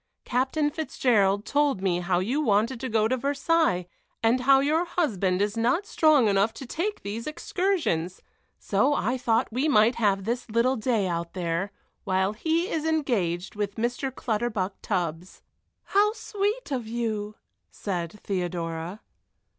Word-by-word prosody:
Captain 270 +4 0
Fitzgerald 215 -10 +1
told 285 -6 +1
me 185 -2 0
how 175 0 0
you 235 +12 0
wanted 230 0 +1
to 260 0 -4
go 220 -1 +2
to 255 - +1
Versailles, 280 - +1 0.4
and 230 +3 +3
how 270 +1 +6
your 305 +5 +2
husband 200 - 0
is 205 +1 -2
not 245 - +1
strong 310 - +4
enough 200 +2 +2
to 270 - -7
take 365 - -3
these 215 +5 -5
excursions, 305 - -1 0.4
so 260 +9 +1
I 250 -1 0
thought 230 -1 +1
we 260 +6 +1
might 230 -5 +5
have 200 -4 +2
this 235 +3 -3
little 235 +4 +2
day 220 -4 0
out 170 -1 -3
there, 175 +2 -2 0.3
while 190 +2 +1
he 325 +9 0
is 320 -5 -2
engaged 230 - 0
with 205 -1 -3
Mr. 245 +4 -2
Clutterbuck 215 -5 -2
Tubbs." 175 -2 -3 0.4
"How 415 +2 +3
sweet 425 -2 -2
of 245 -5 -2
you!" 220 -2 -3 0.3
said 175 -5 -4
Theodora. 175 0 -3
230 Hz, 145 wpm, -26 LUFS, 195-285 Hz, 0.4 s, how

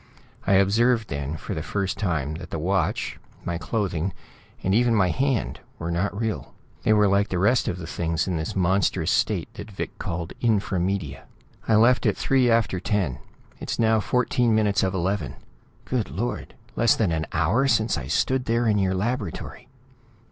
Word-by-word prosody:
I 100 - +4
observed 115 +4 +3
then, 70 +2 -3
for - - -5
the - - -3
first 100 -2 -2
time, 80 -8 -1
that - - -9
the - - -3
watch, - - -1 0.3
my 85 -1 -2
clothing, 95 -3 -2 0.5
and 95 - +1
even 120 +1 +3
my 95 -4 +3
hand, 130 - 0 0.2
were 85 +1 -4
not 100 +4 -1
real; 110 -2 -3 0.3
they - - +2
were 105 -1 +5
like 100 +1 +2
the 90 - -1
rest 105 +9 +3
of 95 -5 -1
the 90 - -7
things 85 +1 -1
in 90 - -1
this 80 0 -3
monstrous 95 +1 +1
state - - 0
that - - -9
Vic 100 - -5
called 85 0 -4
Infra 105 -5 +1
Media. 85 -6 -2 0.4
"I 110 - +4
left 120 +4 +4
at - - +1
three 130 -2 +3
after 115 -5 +2
ten. 90 - -1 0.4
It's - - -4
now 110 -1 +3
fourteen 120 0 +1
minutes 105 -2 +2
of 95 0 0
eleven 85 -7 -1 0.5
Good 125 -5 -1
Lord! - - -4 0.2
Less 115 - +4
than 105 -6 +1
an 80 -1 -1
hour 95 - +2
since 110 -3 +2
I 65 -5 -5
stood 130 - +1
there 115 0 +1
in 105 -2 +3
your 95 -1 +1
laboratory!" 105 -2 -3
100 Hz, 180 wpm, -25 LUFS, 85-115 Hz, 0.5 s, were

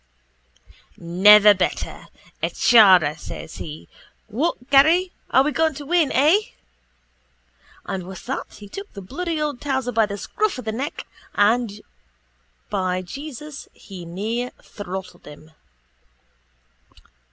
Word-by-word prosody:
—Never 205 +5 +7
better, 185 -2 -3 0.3
a - - 0
chara, 185 -10 +5
says 160 - -9
he. 155 -1 -8 0.4
What 260 +2 -2
Garry? 325 +7 +5 0.2
Are 265 - +5
we 300 - 0
going 320 -1 +1
to 290 0 -8
win? 330 -2 +2
Eh? 305 +9 +4 1.5
And 185 -2 -5
with 190 0 -10
that 265 +3 -4
he 205 - -12
took 395 - -9
the 200 - -8
bloody 325 - -4
old 295 -4 -3
towser 265 -3 -1
by 225 -2 +2
the 200 0 -5
scruff 425 - -2
of 255 - -8
the 220 - -2
neck 260 +6 -5 0.3
and, 210 0 +1 0.9
by 185 -2 -1
Jesus, 285 - -9
he 190 -3 -11
near 215 +8 -3
throttled 190 -3 -8
him. 150 +1 -13
225 Hz, 125 wpm, -22 LUFS, 190-290 Hz, 1.5 s, Never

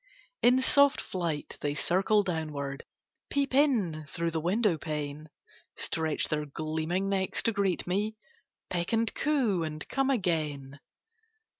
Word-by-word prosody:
In 255 +2 +5
soft 280 +2 +5
flight, 170 -5 -3
they 145 0 -1
circle 195 +7 +3
downward, 150 -6 -3 0.4
Peep 280 -2 0
in 210 - +2
through 170 +1 -2
the 160 -1 -2
window 195 +2 +2
pane; 150 -1 -5 0.5
Stretch 160 -2 -1
their 150 -1 -1
gleaming 160 +5 -2
necks 195 -1 0
to 230 - +2
greet 200 -4 0
me, 205 +4 -1 0.6
Peck 175 +3 -1
and 225 0 +1
coo, 255 - +1
and 155 -1 -4
come 270 0 +1
again. 150 - -1
175 Hz, 130 wpm, -29 LUFS, 155-220 Hz, 0.6 s, In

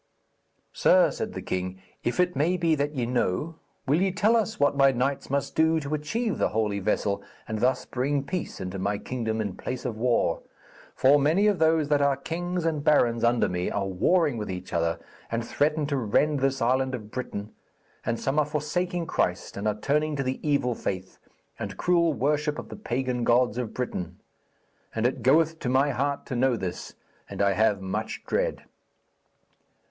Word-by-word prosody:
'Sir,' 180 -4 +5
said - - -4
the - - -6
king, 95 0 -3 0.2
'if 120 - -1
it 180 0 +2
may 170 +6 +2
be 165 -2 +2
that 145 0 -1
ye 125 -3 0
know, 125 - -1 0.3
will 150 +6 +2
ye 190 0 +2
tell 210 +5 +3
us 220 -1 0
what 145 0 +3
my 135 -1 +6
knights 135 +2 -1
must 140 0 -1
do 160 0 +3
to 145 0 -4
achieve 210 +9 -1
the - - +3
Holy 105 -2 0
Vessel, 100 0 0 0.3
and 110 -1 -3
thus 125 +3 +1
bring 135 +2 -1
peace 180 +5 -4
into 90 +1 -5
my 100 +2 0
kingdom 110 -1 -3
in 100 -4 -2
place 130 0 -5
of 120 -3 -2
war? 120 +2 +1 0.5
For 140 +3 +5
many 160 +8 +3
of 205 -3 +3
those 160 -1 +3
that 145 -1 +3
are 140 -1 +3
kings 175 +4 -3
and 155 -3 0
barons 120 -6 +3
under 120 0 +3
me 90 0 -2
are 100 -1 -1
warring 140 - +2
with 105 - -4
each 90 0 -6
other, 85 0 +1 0.3
and 115 0 -1
threaten 150 +4 +1
to 140 -1 -1
rend 135 +5 +2
this 135 -1 +1
island 130 +2 +1
of 110 -3 -9
Britain, 105 -4 -5 0.5
and 115 0 -1
some 140 +3 0
are 150 - +3
forsaking 170 +4 -2
Christ 90 - -1
and 100 +2 -2
are 105 0 -1
turning 150 +4 +1
to 135 - -1
the 130 0 -2
evil 140 -5 +1
faith 95 -4 -5 0.4
and - - -5
cruel 170 -2 +3
worship 150 +2 0
of - - -7
the - - -7
pagan 125 - -2
gods 120 0 +3
of 120 -4 -4
Britain. 90 -8 -4 0.8
And 110 +1 0
it 125 - 0
goeth 160 +4 +3
to 125 - -2
my 135 +3 +3
heart 140 +2 -1
to 125 - -4
know 130 +1 +3
this, 90 -3 -5 0.3
and - - -7
I 100 0 +4
have 105 -1 +2
much 105 +4 -4
dread.' - - -1
135 Hz, 190 wpm, -26 LUFS, 110-155 Hz, 0.8 s, my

